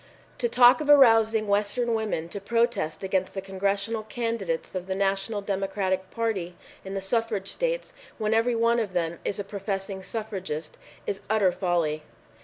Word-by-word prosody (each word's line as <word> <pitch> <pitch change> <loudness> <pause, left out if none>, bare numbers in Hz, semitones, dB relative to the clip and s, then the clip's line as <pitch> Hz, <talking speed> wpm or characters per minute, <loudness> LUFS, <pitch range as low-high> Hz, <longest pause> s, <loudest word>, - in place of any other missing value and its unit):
"To 240 - +1
talk 245 +4 +6
of 295 - -3
arousing 225 -6 +6
the 205 - -3
Western 210 +4 +1
women 215 -7 -1
to 200 - -6
protest 230 -6 0
against 190 0 -1
the - - -1
Congressional 200 +3 -1
candidates 215 -6 -3
of 185 -1 -4
the 190 - -1
National 195 +2 0
Democratic 195 -1 -1
Party 195 -7 -2 0.3
in 195 0 -6
the 195 - -2
suffrage 210 -1 -1
states, - - -2 0.2
when 215 -1 0
every 230 +2 +2
one 230 +1 +3
of 205 -5 -2
them 170 -1 -1
is 200 - -2
a 205 - -2
professing 195 -1 -4
suffragist, 190 -8 -5 0.3
is 195 - -3
utter 210 -4 +3
folly." 175 -4 0
200 Hz, 165 wpm, -26 LUFS, 190-225 Hz, 0.3 s, talk